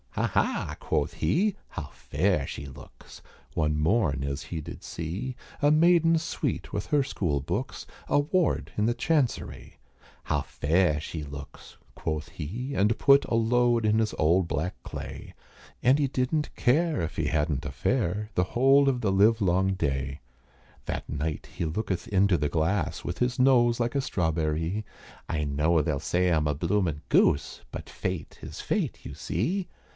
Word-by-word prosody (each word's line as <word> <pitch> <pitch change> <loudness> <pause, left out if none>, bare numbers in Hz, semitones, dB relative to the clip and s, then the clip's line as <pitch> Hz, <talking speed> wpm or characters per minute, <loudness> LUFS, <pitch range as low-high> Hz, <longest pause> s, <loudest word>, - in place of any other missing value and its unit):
"Ha! - - +1
ha!" - - 0
quoth - - -1
he, 200 +5 +1
"how 75 -5 -6
fair 80 -1 0
she 70 - -6
looks," 65 -1 -13 0.3
One 75 -1 0
morn, 75 - +2
as 70 +1 -3
he 85 - -5
did 75 - -8
see, 90 +11 -4 0.3
A 145 - +5
maiden 165 +1 +5
sweet 160 - -3
with - - -2
her 145 -2 +3
school 90 - -1
books, 70 - -4 0.2
A - - +4
ward 160 +3 +1
in 105 +1 +2
the 120 - +1
Chancerie. 135 0 -1 0.5
"How - - 0
fair 80 0 +1
she 75 0 -5
looks!" 70 -1 -10 0.2
quoth 80 -1 -3
he, 115 - -5
and 105 -3 +2
put 140 0 +5
A - - -1
load 120 0 +3
in 110 +1 +3
his 110 -1 0
old 85 +3 +3
black 80 +3 -2
clay, - - -7 0.5
And 130 +3 +5
he 145 -2 +2
didn't 135 +4 -1
care 155 - +2
if 80 - -3
he 80 - 0
hadn't 75 -2 0
a 75 - -3
fare, 105 - -1
The 90 - +2
whole 135 +3 +5
of 125 -2 -1
the 105 -5 +1
live 105 +4 +4
long 95 -1 +2
day. 70 -4 -2 0.7
That - - -3
night 75 +1 -3
he - - -2
looketh 95 +2 -2
into 100 -2 +3
the 75 -1 0
glass, 80 +3 -1
With - - -4
his 125 +1 0
nose 120 -3 +4
like 120 +2 -1
a 140 - +2
strawberrie, 80 - -1 0.5
"I 75 -3 -1
know 75 +3 +2
they'll 75 -1 -1
say 90 +4 +1
I'm 80 -3 +2
a 75 - 0
bloomin' 85 -1 0
goose 70 - +3
But - - -7
fate 90 -3 -4
is - - -7
fate - - -2
you - - -6
see." 190 +1 -2
95 Hz, 170 wpm, -27 LUFS, 75-125 Hz, 0.7 s, A